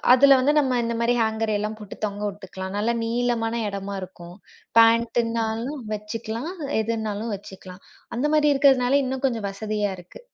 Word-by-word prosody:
அதுல 275 +1 +7
வந்து 285 +3 +3
நம்ம 260 -4 +2
இந்தமாரி 235 +1 0
ஹேங்கர் 220 0 0
எல்லாம் 215 +1 -3
போட்டுத் 210 0 -11
தொங்க 205 0 -3
விட்டுக்கலாம். 190 -1 -7
நல்லா 220 +3 +1
நீளமான 235 -1 0
இடமா 200 0 -5
இருக்கும். 175 -1 -10 0.4
பேண்ட்டுனாலும் 230 +2 +2
வச்சுக்கலாம். 225 - -5 0.3
எதுன்னாலும் 220 -1 -2
வச்சுக்கலாம். 190 -1 -12 0.3
அந்தமாரி 295 +3 +3
இருக்கிறதுனால 270 -1 +4
இன்னும் 265 +1 -4
கொஞ்சம் 225 -6 -2
வசதியா 210 0 -2
இருக்கு. 180 - -13
225 Hz, 135 wpm, -24 LUFS, 205-245 Hz, 0.4 s, அதுல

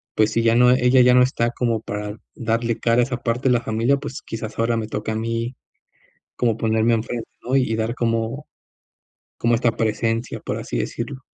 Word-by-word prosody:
pues, 110 0 +3
si 115 +1 +1
ya 115 0 +4
no 125 +1 +6
ella 125 0 +5
ya 125 0 +6
no 125 - +7
está 120 -2 +1
como 115 -3 -1
para 105 0 -5 0.2
darle 115 0 -1
cara 115 +1 +2
a - - +4
esa 125 -1 -3
parte 120 +2 0
de - - +4
la 120 - +2
familia. 115 +5 +1
Pues, 140 -1 -7
quizás, 110 0 -7
ahora 115 0 +1
me 110 -1 -3
toca 110 +1 -3
a - - -3
mí 115 +2 -2 0.8
como 115 -3 +1
ponerme 115 +1 +2
en 110 - 0
frente, 120 0 -5 0.2
¿no? 130 +2 0
Y 125 -4 +1
dar 110 +1 -1
como 115 +4 -1 0.9
como 115 0 +2
esta 115 0 +2
presencia, 115 +2 -1
por - - -3
así - - -4
decirlo. 130 +3 -4
115 Hz, 205 wpm, -22 LUFS, 115-125 Hz, 0.9 s, no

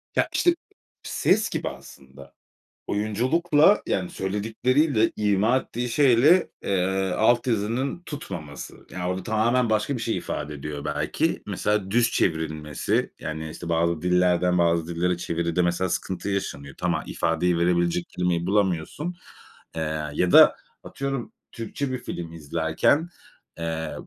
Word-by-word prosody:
Ya, - - +3
işte, 345 -1 +3 0.5
ses 210 +3 +1
gibi - - -2
aslında. 70 +1 -13 0.5
Oyunculukla, 145 - +3
yani, 90 -2 -1
söyledikleriyle, 115 +6 +1
ima 105 +4 +2
ettiği 125 -1 -4
şeyle, 140 +7 +4
eee, 95 0 0
alt 120 +3 +3
yazının 120 +8 -1
tutmaması. 85 - -8
Yani, 95 - -5
orada 90 +1 -2
tamamen 115 +3 +1
başka 110 +5 +1
bir 120 - -5
şey 115 - -1
ifade 75 +1 -4
ediyor 75 0 -6
belki. 75 - -1
Mesela 105 -1 -1
düz 120 +2 +3
çevrilmesi, 80 -3 -1
yani, 80 0 -5
işte, 85 +2 -8
bazı 85 -1 +1
dillerden 90 0 +2
bazı 85 -1 +2
dillere 85 +1 0
çeviride 85 0 -1
mesela 85 +2 0
sıkıntı 95 +3 -3
yaşanıyor. 70 -9 -3
Tam, 90 -1 0
aaa, 80 - -3
ifadeyi 85 +1 0
verebilecek 85 0 +1
kelimeyi 90 -1 -1
bulamıyorsun. 100 - 0 0.6
Eee, 80 -1 -2
ya 90 +3 +1
da - - +8 0.3
atıyorum, 135 -3 -4 0.2
Türkçe 125 +4 -4
bir 130 - -2
film 85 -7 -6
izlerken, 80 - +1 0.5
eee, 80 -1 -3
90 Hz, 130 wpm, -25 LUFS, 85-115 Hz, 0.6 s, da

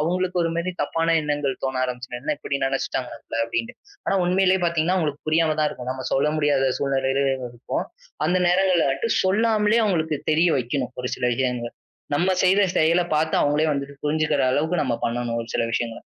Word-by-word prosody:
அவுங்களுக்கு 180 +3 0
ஒரு 165 - 0
மாதிரி 175 +2 -2
தப்பான 165 +3 +1
எண்ணங்கள் 145 -2 -1
தோண 130 -1 -1
ஆரம்ச்சிடும். 125 -1 -5
என்ன 150 +1 -1
இப்படி 140 -2 -3
நினைச்சுட்டாங்க 135 -2 -2
நம்மல 115 0 -7
அப்படின்னு. 115 0 -3 0.3
ஆனா - - +2
உண்மையிலேயே 185 +1 +3
பார்த்தீங்கன்னா 170 +1 +1
அவங்களுக்கு 150 -3 -3
புரியாமதான் 155 -1 +2
இருக்கும். 125 0 -6
நம்ம 130 -1 -6
சொல்ல 140 +3 +2
முடியாத 145 -3 +2
சூழ்நிலையிலும் 135 -1 0
இருப்போம். 120 +1 -4 0.4
அந்த 180 - +2
நேரங்கள்ல 180 -3 +3
வந்துட்டு, 230 +12 -2
சொல்லாமலேயே 215 +2 +3
அவங்களுக்கு 160 -5 0
தெரிய 165 +3 +4
வைக்கணும் 125 +1 -2
ஒரு 125 - -3
சில 125 - -3
விஷயங்களை. 125 -2 -2 0.4
நம்ம 175 +5 +2
செய்த 190 +2 +4 0.2
செயலை 165 +3 +3
பார்த்து 160 +1 0
அவங்களே 150 +2 +2
வந்துட்டு 140 0 -4
புரிஞ்சுக்கிற 150 -1 +1
அளவுக்கு 160 +4 +1
நம்ம 125 -3 0
பண்ணணும் 120 0 -2
ஒரு 115 - -12
சில - - +1
விஷயங்களை. 120 -1 -2
150 Hz, 170 wpm, -23 LUFS, 130-170 Hz, 0.4 s, தெரிய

